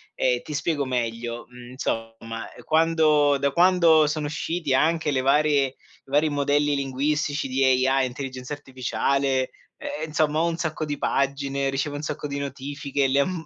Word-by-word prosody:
Ehm, -, -, +1 dB
ti 150 Hz, -, -8 dB
spiego 155 Hz, -2 st, 0 dB
meglio: 120 Hz, -1 st, -3 dB
mh, 125 Hz, 0 st, -12 dB
insomma, 115 Hz, -2 st, -4 dB, 0.2 s
quando 155 Hz, -3 st, +3 dB
da 140 Hz, 0 st, 0 dB
quando 170 Hz, -2 st, +5 dB
sono 150 Hz, 0 st, -2 dB
usciti 155 Hz, 0 st, -2 dB
anche 160 Hz, +2 st, +2 dB
le 130 Hz, -2 st, +1 dB
varie 145 Hz, +1 st, +3 dB
i 130 Hz, -, -12 dB, 0.3 s
vari 150 Hz, +3 st, +3 dB
modelli 145 Hz, 0 st, +1 dB
linguistici 140 Hz, +2 st, -1 dB
di 135 Hz, +1 st, 0 dB, 0.2 s
AI 135 Hz, 0 st, +2 dB
intelligenza 130 Hz, +1 st, -6 dB
artificiale, 135 Hz, -1 st, -1 dB, 0.3 s
ehm, 155 Hz, -, -5 dB
insomma, 155 Hz, 0 st, +1 dB
ho 170 Hz, -, +2 dB
un 165 Hz, -, -2 dB
sacco 155 Hz, -1 st, -3 dB
di 145 Hz, -1 st, -3 dB
pagine, 140 Hz, 0 st, 0 dB
ricevo 140 Hz, +2 st, -2 dB
un 145 Hz, -, -4 dB
sacco 150 Hz, 0 st, -4 dB
di 140 Hz, 0 st, -4 dB
notifiche, 140 Hz, 0 st, -2 dB
le 140 Hz, +1 st, +3 dB
mhmm, 175 Hz, 0 st, -4 dB
140 Hz, 160 wpm, -24 LUFS, 135-155 Hz, 0.3 s, quando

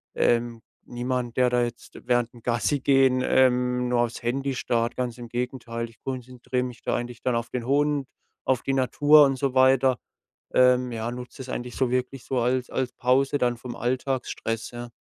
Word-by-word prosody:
ähm, 120 Hz, -1 st, +1 dB, 0.2 s
niemand, 125 Hz, 0 st, -3 dB
der 125 Hz, -1 st, +4 dB
da 125 Hz, 0 st, +2 dB
jetzt 120 Hz, 0 st, -7 dB
während 120 Hz, -1 st, +1 dB
dem 120 Hz, -, -15 dB
Gassigehen 130 Hz, +1 st, +2 dB
ähm, 125 Hz, -1 st, +2 dB
nur 120 Hz, -1 st, +1 dB
auf's 120 Hz, 0 st, -3 dB
Handy 135 Hz, +2 st, -1 dB
starrt, 115 Hz, -1 st, -1 dB
ganz 125 Hz, -2 st, -2 dB
im 120 Hz, -1 st, -8 dB
Gegenteil. 120 Hz, -1 st, -4 dB
Ich 115 Hz, -, -22 dB
konzentriere 125 Hz, -1 st, -4 dB
mich 125 Hz, -2 st, -7 dB
da -, -, 0 dB
eigentlich 120 Hz, 0 st, -5 dB
dann 125 Hz, -2 st, 0 dB
auf 115 Hz, 0 st, -2 dB
den 120 Hz, -2 st, -4 dB
Hund, 145 Hz, 0 st, +1 dB, 0.4 s
auf 130 Hz, -3 st, +1 dB
die 135 Hz, -, -1 dB
Natur 145 Hz, +3 st, +5 dB
und 135 Hz, -1 st, +1 dB
so 135 Hz, -2 st, -1 dB
weiter. 130 Hz, 0 st, +4 dB, 0.6 s
Ähm, 125 Hz, -1 st, +4 dB
ja, 115 Hz, 0 st, -3 dB
nutze 125 Hz, 0 st, -8 dB
das 130 Hz, -, -7 dB
eigentlich 120 Hz, 0 st, -5 dB
so 130 Hz, -2 st, +1 dB
wirklich 125 Hz, +1 st, -2 dB
so 130 Hz, -2 st, -1 dB
als 125 Hz, +1 st, 0 dB
als 130 Hz, -2 st, -2 dB
Pause 135 Hz, +3 st, +2 dB
dann 120 Hz, -1 st, +1 dB
vom 120 Hz, 0 st, -8 dB
Alltagsstress, 125 Hz, -2 st, -2 dB
ja. 120 Hz, 0 st, -7 dB
125 Hz, 185 wpm, -25 LUFS, 120-130 Hz, 0.6 s, Natur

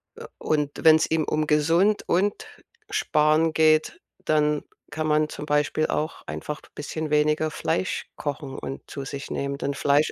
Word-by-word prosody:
äh, -, -, -9 dB
und 150 Hz, -2 st, 0 dB
wenn's 160 Hz, 0 st, +7 dB
ihm 160 Hz, -1 st, +1 dB
um 155 Hz, 0 st, 0 dB
gesund 165 Hz, +8 st, +3 dB
und 195 Hz, +4 st, +1 dB, 0.4 s
sparen 155 Hz, -, +2 dB
geht, 155 Hz, 0 st, +3 dB, 0.3 s
dann 150 Hz, -1 st, +2 dB, 0.3 s
kann 155 Hz, +1 st, -2 dB
man 150 Hz, 0 st, +3 dB
zum 150 Hz, -, -7 dB
Beispiel 150 Hz, +1 st, +1 dB
auch 155 Hz, +2 st, -2 dB
einfach 150 Hz, 0 st, -5 dB
bisschen 155 Hz, +1 st, -4 dB
weniger 150 Hz, +1 st, +2 dB
Fleisch 165 Hz, +4 st, -2 dB
kochen 140 Hz, -2 st, -5 dB
und 135 Hz, -, -6 dB
zu 140 Hz, -2 st, -6 dB
sich 140 Hz, 0 st, -7 dB
nehmen. 140 Hz, 0 st, -2 dB
Denn 140 Hz, 0 st, -2 dB
Fleisch 145 Hz, +2 st, +2 dB
155 Hz, 155 wpm, -25 LUFS, 150-160 Hz, 0.4 s, wenn's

